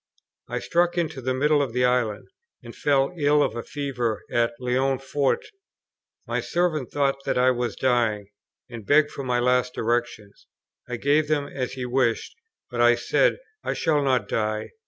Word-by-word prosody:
I -, -, -2 dB
struck 175 Hz, 0 st, +1 dB
into 160 Hz, -6 st, -2 dB
the 130 Hz, +1 st, -1 dB
middle 145 Hz, +2 st, +3 dB
of 130 Hz, -5 st, -2 dB
the 125 Hz, 0 st, +2 dB
island, 125 Hz, -4 st, 0 dB, 0.4 s
and -, -, -10 dB
fell 140 Hz, +2 st, +1 dB
ill 145 Hz, 0 st, +4 dB
of 110 Hz, -, -2 dB
a 120 Hz, -, -3 dB
fever 125 Hz, -6 st, -3 dB
at 120 Hz, 0 st, +1 dB
Leonforte. 135 Hz, +2 st, 0 dB, 0.8 s
My -, -, -2 dB
servant 170 Hz, -7 st, -1 dB
thought 140 Hz, -1 st, 0 dB
that -, -, 0 dB
I 130 Hz, +1 st, +4 dB
was 120 Hz, -1 st, -2 dB
dying, 115 Hz, -5 st, +1 dB, 0.4 s
and 120 Hz, -3 st, -9 dB
begged 145 Hz, +6 st, +3 dB
for 140 Hz, -, -6 dB
my 125 Hz, -1 st, 0 dB
last 125 Hz, 0 st, +1 dB
directions. 115 Hz, -3 st, -3 dB, 0.4 s
I 125 Hz, -, -2 dB
gave 145 Hz, +4 st, +2 dB
them, 145 Hz, -2 st, 0 dB
as 130 Hz, -2 st, -4 dB
he 130 Hz, -2 st, -4 dB
wished; 125 Hz, -2 st, 0 dB, 0.4 s
but 120 Hz, -1 st, -1 dB
I 120 Hz, 0 st, +6 dB
said, -, -, +2 dB, 0.3 s
"I -, -, -2 dB
shall 150 Hz, -2 st, +1 dB
not 130 Hz, -3 st, +1 dB
die." 110 Hz, -1 st, -2 dB
130 Hz, 170 wpm, -24 LUFS, 120-145 Hz, 0.8 s, I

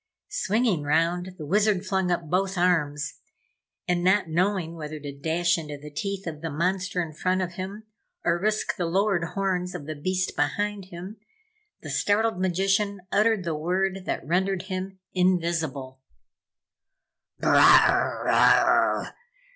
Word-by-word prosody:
Swinging 225 Hz, -, 0 dB
round, 170 Hz, +5 st, 0 dB
the 155 Hz, -, -7 dB
Wizard 200 Hz, +3 st, +2 dB
flung 190 Hz, -2 st, 0 dB
up 170 Hz, -2 st, -1 dB
both 190 Hz, +3 st, 0 dB
arms 155 Hz, -5 st, 0 dB, 0.7 s
and 175 Hz, -1 st, 0 dB
not 190 Hz, +1 st, +3 dB
knowing 175 Hz, 0 st, 0 dB
whether 155 Hz, -2 st, -7 dB
to 145 Hz, -1 st, -6 dB
dash 165 Hz, +4 st, +1 dB
into 150 Hz, -2 st, -7 dB
the 150 Hz, +1 st, -11 dB
teeth 195 Hz, +5 st, -4 dB
of 155 Hz, -3 st, -6 dB
the 165 Hz, -, -3 dB
monster 180 Hz, +4 st, -1 dB
in 160 Hz, -2 st, -8 dB
front 185 Hz, +4 st, 0 dB
of 180 Hz, -2 st, -2 dB
him, 195 Hz, +4 st, -6 dB, 0.4 s
or 170 Hz, 0 st, +2 dB
risk 215 Hz, +1 st, 0 dB
the 175 Hz, -, -1 dB
lowered 190 Hz, 0 st, +1 dB
horns 185 Hz, -2 st, -1 dB
of 155 Hz, -5 st, -6 dB
the 155 Hz, -, -4 dB
huge 145 Hz, -1 st, -14 dB
beast 185 Hz, 0 st, -1 dB
behind 200 Hz, +7 st, -1 dB
him, 185 Hz, +4 st, -9 dB, 0.7 s
the -, -, -6 dB
startled 210 Hz, -1 st, +1 dB
magician 195 Hz, +2 st, +1 dB
uttered 215 Hz, -1 st, +2 dB
the 170 Hz, -2 st, -2 dB
word 185 Hz, +4 st, -1 dB
that -, -, -2 dB
rendered 185 Hz, +3 st, 0 dB
him 190 Hz, 0 st, -5 dB, 0.2 s
invisible. 165 Hz, -8 st, 0 dB, 1.4 s
"Brr -, -, +1 dB
rah!" -, -, +4 dB
180 Hz, 145 wpm, -26 LUFS, 165-195 Hz, 1.4 s, rah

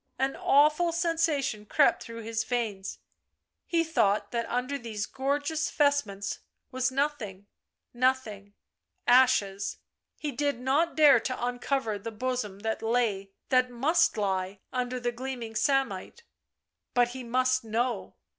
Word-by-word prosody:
An 270 Hz, +1 st, 0 dB
awful 300 Hz, +4 st, +4 dB
sensation 320 Hz, -10 st, 0 dB
crept 290 Hz, +5 st, +3 dB
through 230 Hz, -1 st, -8 dB
his 225 Hz, 0 st, -2 dB
veins; 220 Hz, -5 st, -3 dB, 0.7 s
he 335 Hz, -1 st, +2 dB
thought 215 Hz, -11 st, +1 dB
that 235 Hz, -1 st, -2 dB
under 255 Hz, +3 st, -1 dB
these 220 Hz, -4 st, -4 dB
gorgeous 285 Hz, +4 st, -1 dB
vestments 285 Hz, -10 st, 0 dB, 0.3 s
was 255 Hz, 0 st, 0 dB
nothing 260 Hz, -8 st, -2 dB, 0.2 s
— -, -, -58 dB
nothing 240 Hz, -5 st, -1 dB, 0.3 s
— -, -, -57 dB, 0.2 s
ashes. 225 Hz, -6 st, +3 dB, 0.4 s
He 300 Hz, -, -3 dB
did 285 Hz, 0 st, -1 dB
not 280 Hz, +7 st, +1 dB
dare 295 Hz, -3 st, +7 dB
to 255 Hz, -1 st, -3 dB
uncover 245 Hz, -3 st, -1 dB
the 230 Hz, -, -5 dB
bosom 220 Hz, -3 st, -3 dB
that 220 Hz, 0 st, -2 dB
lay, 225 Hz, -4 st, 0 dB, 0.2 s
that 255 Hz, -1 st, +3 dB
must 265 Hz, +4 st, +2 dB
lie, 190 Hz, -1 st, -1 dB
under 250 Hz, 0 st, -2 dB
the 240 Hz, 0 st, -1 dB
gleaming 240 Hz, -2 st, -6 dB
samite.... 270 Hz, -, 0 dB, 0.7 s
But 245 Hz, -1 st, +4 dB
he 255 Hz, +1 st, -7 dB
must 255 Hz, +1 st, +1 dB
know. 230 Hz, +3 st, -2 dB
250 Hz, 135 wpm, -28 LUFS, 220-275 Hz, 0.7 s, dare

